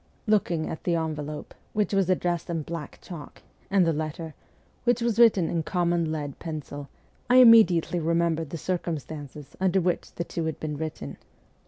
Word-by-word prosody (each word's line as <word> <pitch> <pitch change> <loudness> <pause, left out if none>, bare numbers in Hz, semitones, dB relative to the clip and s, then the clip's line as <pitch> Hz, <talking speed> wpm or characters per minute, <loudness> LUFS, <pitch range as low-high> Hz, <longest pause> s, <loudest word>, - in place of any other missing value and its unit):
Looking 175 -7 +1
at 160 - -6
the 175 - +1
envelope, 155 -2 -4 0.2
which 210 -1 0
was 195 -2 +2
addressed 175 -2 0
in 165 -2 -2
black 165 -2 -6
chalk, 165 -5 -10 0.3
and 195 -2 +4
the 165 - +2
letter, 155 +1 -4 0.5
which 245 0 +2
was 235 -1 0
written 205 -8 +6
in 170 - -1
common 170 -1 0
lead 145 -3 -4
pencil, 145 -3 -6 0.4
I 250 - +5
immediately 220 -9 +7
remembered 165 -1 0
the 165 - -5
circumstances 150 -5 -5
under 190 0 +2
which 180 -1 -1
the 170 - -2
two 170 -1 -4
had 160 -2 -3
been 150 -1 -3
written. 145 - -5
165 Hz, 165 wpm, -26 LUFS, 155-185 Hz, 0.5 s, immediately